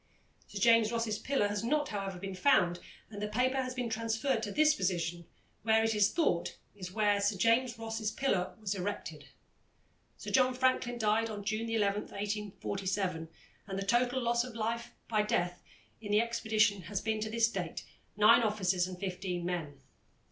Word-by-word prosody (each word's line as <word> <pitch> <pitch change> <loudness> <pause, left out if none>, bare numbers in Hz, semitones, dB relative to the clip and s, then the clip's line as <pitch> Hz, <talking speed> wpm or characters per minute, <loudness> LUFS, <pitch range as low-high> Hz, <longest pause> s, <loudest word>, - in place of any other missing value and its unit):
Sir - - -8
James 230 -2 +5
Ross's 230 -3 -1
pillar 270 -7 +1
has 205 +1 -3
not, 295 +5 +1
however, 195 -2 -4
been 195 +1 -6
found, 180 -5 +3 0.3
and 205 -1 -7
the 210 - -1
paper 250 +5 +1
has 255 0 -4
been 250 -2 -2
transferred 225 +2 -1
to 210 -2 -4
this 305 +3 +4
position, 175 - -2 0.3
which, 220 0 +3
it 225 0 +3
is 210 -2 +3
thought, 300 - 0 0.2
is 185 -2 -7
where 205 -1 +2
Sir 200 0 +1
James 230 +4 +2
Ross's 225 -1 -3
pillar 205 -7 -1
was 205 -2 -2
erected. 200 +1 -5 0.9
Sir - - -7
John 255 -1 +3
Franklin 255 -1 +1
died 220 0 +1
on 205 -2 -6
June 220 +2 -2
11, 210 -2 +1
1847, 200 -4 -3 0.4
and 195 -1 -4
the 195 - -3
total 245 +4 +2
loss 235 0 +2
of 250 -2 -9
life 230 +1 -2 0.2
by 215 -2 +2
death 175 -4 -1 0.4
in 205 -2 -5
the 210 - +5
expedition 220 -3 +1
has 195 +3 -3
been 220 0 -2
to 215 - -2
this 230 +1 +3
date 180 -7 -5 0.3
nine 215 +3 +7
officers 190 -5 +1
and 185 -1 -7
fifteen 180 -2 -3
men. 165 -6 -4
215 Hz, 175 wpm, -32 LUFS, 195-230 Hz, 0.9 s, nine